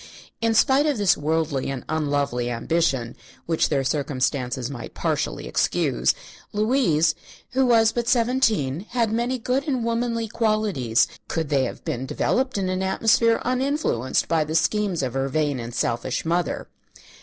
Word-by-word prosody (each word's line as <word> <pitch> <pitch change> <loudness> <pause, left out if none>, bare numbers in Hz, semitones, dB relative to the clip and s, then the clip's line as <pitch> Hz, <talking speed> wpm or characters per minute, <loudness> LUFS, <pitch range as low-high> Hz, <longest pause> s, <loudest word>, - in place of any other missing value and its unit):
In 230 -1 +2
spite 270 +6 +4
of 290 -4 +1
this 205 -3 +4
worldly 155 -3 -1
and 135 -2 -5
unlovely 145 -5 -1
ambition, 125 -1 0 0.3
which 165 -1 +1
their 140 -3 +1
circumstances 130 -3 -1
might 130 -4 -8
partially - - -2
excuse, - - +1 0.4
Louise, 210 - +2 0.4
who 265 +1 +2
was 225 -2 +5
but 235 0 -2
seventeen, 225 - +1
had 230 -3 0
many 240 +3 0
good 255 +5 -1
and 255 -5 0
womanly 230 -1 -1
qualities, 210 - +1 0.2
could 160 -3 -2
they 135 -3 +2
have - - -7
been 130 +2 -3
developed 260 - 0
in 190 -2 -1
an 185 0 -1
atmosphere 225 +4 +3
uninfluenced 255 - 0
by 160 -1 +2
the 155 +1 -4
schemes 185 -1 +1
of 125 -2 -2
her 135 0 -1
vain 145 -2 0
and 120 0 -6
selfish 120 +4 -1
mother. 170 -2 -1
170 Hz, 150 wpm, -24 LUFS, -, 0.4 s, was